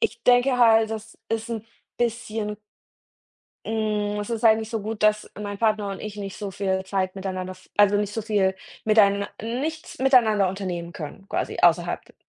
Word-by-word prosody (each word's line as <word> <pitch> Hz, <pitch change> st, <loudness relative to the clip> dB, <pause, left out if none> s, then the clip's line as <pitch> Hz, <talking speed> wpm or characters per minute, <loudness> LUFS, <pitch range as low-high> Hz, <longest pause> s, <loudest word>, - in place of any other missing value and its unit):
...ich 450 Hz, -, -1 dB
denke 250 Hz, +1 st, +4 dB
halt, 225 Hz, -2 st, +5 dB
das 220 Hz, 0 st, -7 dB
ist 225 Hz, +1 st, -2 dB
'n 225 Hz, -2 st, -4 dB, 0.3 s
bisschen 225 Hz, -3 st, -2 dB, 1.1 s
hm, 210 Hz, -2 st, -1 dB
es 205 Hz, -, -5 dB
ist 230 Hz, 0 st, -2 dB
eigentlich 220 Hz, 0 st, +4 dB
so 225 Hz, -2 st, -2 dB
gut, 215 Hz, 0 st, -4 dB
dass 215 Hz, 0 st, +2 dB
mein 205 Hz, -1 st, -5 dB
Partner 215 Hz, -2 st, +1 dB
und 195 Hz, -, -6 dB
ich 210 Hz, -1 st, -6 dB
nicht 195 Hz, -1 st, -6 dB
so 205 Hz, -2 st, -5 dB
viel 190 Hz, 0 st, -1 dB
Zeit 190 Hz, -1 st, -1 dB
miteinander 185 Hz, -1 st, -4 dB
v 185 Hz, -, -21 dB
also 205 Hz, 0 st, +5 dB
nicht 205 Hz, 0 st, -1 dB
so 225 Hz, -, -2 dB
viel 200 Hz, -3 st, +1 dB, 0.3 s
miteinan 200 Hz, -2 st, +4 dB
nichts 275 Hz, +9 st, -4 dB
miteinander 225 Hz, -7 st, +4 dB
unternehmen 180 Hz, -3 st, -4 dB
können 175 Hz, +5 st, -8 dB
quasi -, -, -2 dB
außerhalb 175 Hz, 0 st, +3 dB
d -, -, -22 dB
210 Hz, 175 wpm, -24 LUFS, 195-225 Hz, 1.1 s, halt